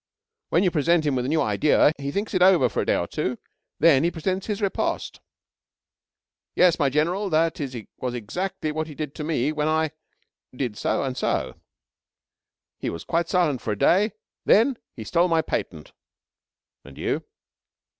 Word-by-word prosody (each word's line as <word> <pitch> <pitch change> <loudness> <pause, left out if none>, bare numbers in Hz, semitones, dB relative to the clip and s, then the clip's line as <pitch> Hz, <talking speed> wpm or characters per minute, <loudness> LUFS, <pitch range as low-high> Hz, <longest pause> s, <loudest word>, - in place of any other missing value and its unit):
"When 170 - +3
you 180 - +2
present 165 +1 +2
him 145 -3 +1
with 125 -1 -1
a - - -2
new 155 0 +2
idea, 135 +7 +3
he 140 0 -3
thinks 200 +9 -3
it 185 - +1
over 180 -9 +5
for - - -1
a - - -2
day - - +3
or - - 0
two. - - -3 0.4
Then 155 -4 +5
he 170 - +3
presents 185 +3 -3
his 210 -2 -2
riposte." 200 -3 -2 1.4
"Yes, 180 -2 +4
my 140 -3 +3
General. 175 +8 0
That 165 0 +1 0.4
was 125 -1 -3
exactly 155 - -3
what 155 +1 -3
he 150 - -10
did 150 -2 -5
to 155 - -6
me 150 -3 0
when 150 0 -1
I 160 -1 +1 0.6
did 125 -5 -3
so - - -1
and 130 -2 -3
so. - - -1 1.3
He - - -2
was 85 - -6
quite 170 +1 -1
silent 165 -9 +1
for 105 - -2
a - - -6
day. 200 - +3 0.3
Then 235 +3 +4 0.2
he 110 - -7
stole 170 +9 +2
my 165 -2 +2
patent." 80 - -4 0.9
"And - - -14
you?" - - -2
155 Hz, 175 wpm, -24 LUFS, 140-180 Hz, 1.4 s, over